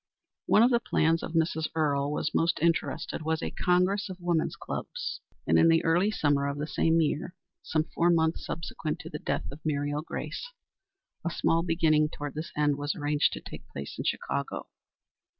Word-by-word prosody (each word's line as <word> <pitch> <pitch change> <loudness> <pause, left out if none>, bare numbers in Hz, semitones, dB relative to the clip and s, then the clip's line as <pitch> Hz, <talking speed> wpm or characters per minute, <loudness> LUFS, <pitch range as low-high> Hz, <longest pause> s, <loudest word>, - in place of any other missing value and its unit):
One 215 - +6
of 245 - +5
the 235 - +4
plans 165 -7 +2
in - - -4
which 165 0 +3
Mrs. 160 0 -2
Earle 145 -2 +1
was 150 0 -1
most 165 -1 +2
interested 165 -1 0
was 160 +1 -1
a - - -2
Congress 190 +3 +2
of 185 - -6
Women's 175 -2 0
Clubs, - - -5 0.2
and - - +4
in - - +6
the 165 0 +4
early 175 +5 +3
summer 145 -8 +1
of 140 0 -2
the 150 - -2
same 160 +3 +2
year 160 +4 -1 0.3
some 155 -1 0
four 170 +2 +1
months 160 -1 +2
subsequent 160 -1 -4
to - - -9
the 150 - -5
death - - -2
of 140 - -9
Muriel 145 -1 -1
Grace 165 - -5 0.8
a 170 - 0
small 165 0 +2
beginning 160 -3 +3
toward 145 -2 -6
this 155 +2 -5
end 145 -1 +2
was 145 0 -1
arranged 145 -1 +2
to - - -6
take - - -10
place 70 0 -7
in - - -1
Chicago. 70 - -2
160 Hz, 190 wpm, -29 LUFS, 150-170 Hz, 0.8 s, One